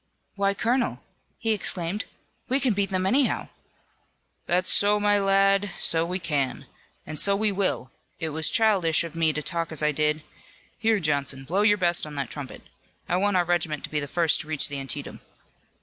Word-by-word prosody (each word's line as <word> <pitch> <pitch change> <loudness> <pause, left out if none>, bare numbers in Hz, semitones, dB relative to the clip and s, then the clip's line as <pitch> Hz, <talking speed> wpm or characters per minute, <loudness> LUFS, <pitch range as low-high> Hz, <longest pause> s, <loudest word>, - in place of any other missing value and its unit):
"Why, 200 -1 0
colonel!" 240 +4 -1 0.3
he 225 - -1
exclaimed, 195 -1 -1 0.4
"we 265 +2 +2
can 255 -4 +2
beat 200 -1 -1
them 185 -1 -1
anyhow!" 255 +7 +1 1.0
"That's 180 +1 +2
so, 205 +1 +4
my 205 0 +3
lad, 195 0 +3
so 165 0 +3
we 180 +1 -2
can! 145 -7 -2 0.4
And 155 - -5
so 200 0 +3
we 210 +1 +2
will! 185 -10 -2 0.3
It 165 -2 -3
was 155 +1 +2
childish 185 -8 +3
of 165 -2 -7
me 165 -1 +1
to 155 0 -4
talk 170 -1 -2
as 155 -1 -2
I 150 - +3
did. 150 +1 0 0.6
Here, 225 -2 +2
Johnson, 140 -4 -1
blow 180 +9 0
your 205 0 +4
best 175 -4 +2
on 150 - -9
that 140 -4 -4
trumpet. 145 -4 -8 0.4
I 175 - 0
want 200 0 +1
our 175 - +2
regiment 165 -4 -1
to - - -6
be 150 - 0
the 145 - -4
first 165 +1 +1
to - - -12
reach 155 -2 +2
the 140 -1 -4
Antietam." 135 -2 -4
175 Hz, 190 wpm, -25 LUFS, 155-200 Hz, 1.0 s, so